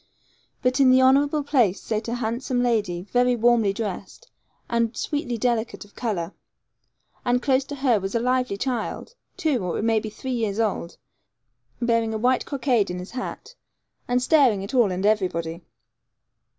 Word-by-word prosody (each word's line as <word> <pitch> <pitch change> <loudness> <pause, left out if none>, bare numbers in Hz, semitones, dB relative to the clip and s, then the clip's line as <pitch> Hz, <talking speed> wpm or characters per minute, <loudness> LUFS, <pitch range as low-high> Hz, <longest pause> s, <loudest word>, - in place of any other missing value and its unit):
But 255 +1 +1
in 270 -2 +6
the 255 0 +6
honourable 280 +3 +4
place 245 -10 +2
sate 220 0 -3
a 235 - -2
handsome 245 +2 -1
lady, 210 -8 0
very 250 0 +3
warmly 235 -3 +3
dressed, 220 - -6 0.4
and 235 0 0
sweetly 290 -5 -2
delicate 235 -2 -1
of 205 - -22
colour. 200 -9 -3 0.9
And 245 0 +2
close 265 +1 +2
to 285 - -6
her 260 -5 +2
was 195 +3 -4
a - - +3
lively 250 -3 0
child, 250 - -3 0.2
two 310 - 0
or 180 - -2
it - - -2
may 225 -1 +3
be 215 - -6
three 260 +5 -6
years 220 -3 -1
old, 200 -6 -2 0.8
bearing 230 -2 +1
a - - 0
white 250 +3 +1
cockade 250 -7 +1
in 180 - -4
his 180 +1 -8
hat, 345 - -6 0.5
and 245 0 +1
staring 255 -10 +4
at 200 - -7
all 240 -7 +4
and 185 +2 -2
everybody. 180 -5 0
235 Hz, 165 wpm, -24 LUFS, 210-255 Hz, 0.9 s, in